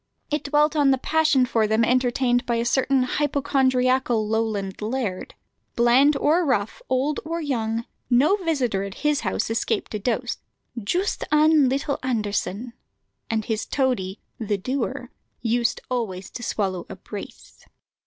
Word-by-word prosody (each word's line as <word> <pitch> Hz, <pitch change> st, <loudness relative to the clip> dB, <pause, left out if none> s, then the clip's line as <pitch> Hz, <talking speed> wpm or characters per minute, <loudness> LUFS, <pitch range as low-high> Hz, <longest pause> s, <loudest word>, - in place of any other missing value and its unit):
It 300 Hz, -, -1 dB
dwelt 295 Hz, +2 st, +2 dB
on 290 Hz, -2 st, +4 dB
the 265 Hz, -, +4 dB
passion 305 Hz, -2 st, +2 dB
for 225 Hz, -4 st, +1 dB
them 220 Hz, +2 st, +3 dB
entertained 245 Hz, 0 st, +1 dB
by 235 Hz, -, +1 dB
a 230 Hz, 0 st, 0 dB
certain 265 Hz, +1 st, +2 dB
hypochondriacal 260 Hz, -4 st, +1 dB
Lowland 215 Hz, -3 st, -2 dB
laird. 215 Hz, -4 st, -3 dB, 0.4 s
Bland 260 Hz, +5 st, +4 dB
or 320 Hz, +6 st, +3 dB
rough, 220 Hz, -8 st, -1 dB
old 270 Hz, +3 st, +1 dB
or 330 Hz, +2 st, -3 dB
young, 230 Hz, -6 st, -2 dB, 0.2 s
no 270 Hz, +10 st, +4 dB
visitor 275 Hz, -, 0 dB
at 195 Hz, 0 st, -5 dB
his 295 Hz, -1 st, +3 dB
house 215 Hz, +2 st, -2 dB
escaped 225 Hz, -1 st, -1 dB
a 210 Hz, -, -2 dB
dose 245 Hz, +3 st, -2 dB, 0.4 s
"joost 360 Hz, -, -1 dB
ane 300 Hz, -2 st, +5 dB
leetle 280 Hz, +2 st, -1 dB
Anderson;" 220 Hz, -1 st, -2 dB, 0.6 s
and 220 Hz, -2 st, -1 dB
his 220 Hz, -1 st, -2 dB
toady 245 Hz, -9 st, -1 dB, 0.2 s
"the 210 Hz, -3 st, -1 dB
doer" 255 Hz, +8 st, -3 dB, 0.3 s
used 235 Hz, 0 st, 0 dB
always 210 Hz, -7 st, -3 dB
to -, -, -7 dB
swallow 190 Hz, -6 st, -2 dB
a -, -, -7 dB
brace. -, -, -10 dB
245 Hz, 145 wpm, -24 LUFS, 220-280 Hz, 0.6 s, ane